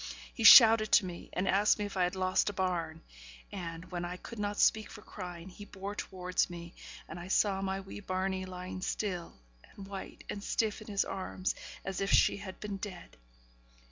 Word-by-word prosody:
He 230 - -4
shouted 225 -1 +9
to - - +6
me, 175 -1 -8
and 185 +2 -1
asked 205 +2 +4
me 210 - -2
if 205 - -7
I 185 -1 +3
had 180 +2 -3
lost 185 +1 +1
a - - -5
bairn; 170 -4 -2 0.5
and, 170 -3 -6
when 175 -1 -3
I 175 +1 -5
could 235 +4 -10
not 205 0 -2
speak 220 -1 +3
for 210 -2 -11
crying, 180 -3 -8
he 195 +2 -11
bore 200 0 -7
towards 185 -3 -2
me, 170 0 -9 0.3
and 165 - -8
I 175 - -8
saw 195 0 +2
my 195 0 -2
wee 195 +1 -9
bairnie, 185 0 -2
lying 185 0 -7
still, 185 -3 -3 0.3
and 200 - -12
white, 195 -1 -8
and 200 - -5
stiff 220 0 -1
in 215 - -11
his 200 -2 0
arms, 190 -1 -3 0.3
as 195 -1 -3
if 195 - 0
she - - +5
had 190 -2 -9
been 205 -2 -5
dead. 185 -3 -8
190 Hz, 200 wpm, -31 LUFS, 180-205 Hz, 0.5 s, shouted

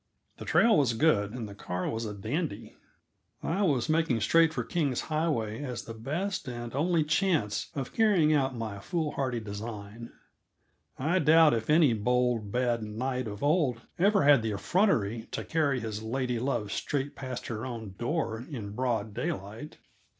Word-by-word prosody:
The - - -8
trail 230 -1 +5
was 130 -5 +2
good, 110 -6 +2
and 120 -3 -5
the 100 - -9
car 90 -2 -4
was 115 0 -2
a 105 - -4
dandy. 110 - -4 0.7
I 180 +5 0
was 140 - +2
making 155 -6 +2
straight 165 +8 +4
for - - -2
King's 145 -8 -1
Highway 150 -9 -1
as 125 -5 -4
the 115 - -8
best 155 - -3
and 120 -1 -6
only 160 +3 +2
chance 155 - 0
of 135 -3 -4
carrying 195 -9 +4
out 135 -3 +1
my 110 -4 -5
foolhardy 140 - -2
design. 110 +1 -7 0.9
I 160 +8 +1
doubt 160 0 +6
if 115 -1 -2
any 150 -5 +5
bold, 120 -1 +1
bad 120 -1 +1
knight 125 +4 -3
of 105 +2 -6
old 145 -6 +2 0.2
ever 200 +2 +4
had 140 -3 +6
the 110 -1 -2
effrontery 115 - +1
to - - -3
carry 145 -5 +1
his 110 -2 -4
lady 125 +1 -2
love 120 -5 -1
straight 145 +3 -2
past 130 -2 -6
her 115 -1 -4
own 115 -6 -6
door 120 -3 -2
in 110 -9 -6
broad 115 -2 -1
daylight. 120 - -5
125 Hz, 165 wpm, -29 LUFS, 110-155 Hz, 0.9 s, doubt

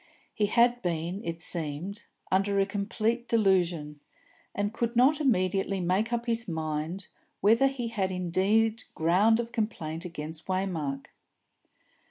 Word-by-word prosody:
He 210 - +1
had 240 +3 +3
been, 175 +3 -2
it 165 -3 -4
seemed, 170 +4 -3 0.3
under 195 +1 +2
a 195 - +4
complete 215 +4 -1
delusion, 175 -9 +1 0.6
and 205 +1 -1
could 235 +1 -2
not 275 +6 +4
immediately 195 -6 +1
make 185 +6 0
up 235 0 -1
his 230 -1 -1
mind 160 +2 -3 0.3
whether 230 +6 +5
he 255 -4 -3
had 195 -4 -1
indeed 200 +6 +1
ground 195 +8 +4
of 235 0 -3
complaint 175 -9 -3
against 160 -2 -7
Waymark. 170 -8 -2
195 Hz, 130 wpm, -28 LUFS, 170-225 Hz, 0.6 s, whether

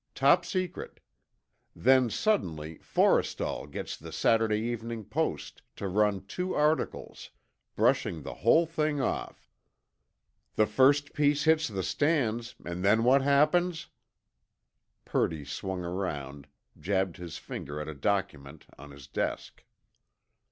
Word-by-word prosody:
Top 140 +6 +4
secret. 185 0 -4 0.8
Then 130 -1 +4
suddenly, 80 - -1
Forrestal - - +1
gets - - -5
the - - -11
Saturday 110 -1 +2
Evening 115 0 -4
Post - - -3
to 100 - -4
run 100 0 +1
two 180 +1 -3
articles, 150 +1 -1 0.5
brushing 80 -3 +1
the - - -6
whole 160 - +4
thing 155 -2 -1
off. 130 - -3 1.1
The 110 - +4
first 140 +6 +3
piece 145 0 +2
hits 160 -1 +3
the 95 -4 -4
stands—and 115 - -1
then 110 +3 +4
what 130 +3 +5
happens?" 155 +5 +2 1.2
Purdy 80 -3 -1
swung 90 +5 -4
around, 75 -6 -4 0.3
jabbed 95 +1 -1
his 90 -3 -7
finger 75 +2 -7
at 75 - -5
a 80 - -5
document 80 -4 -3
on. 75 +1 -11
his 70 -1 -12
desk. - - -4
110 Hz, 115 wpm, -29 LUFS, 85-145 Hz, 1.2 s, what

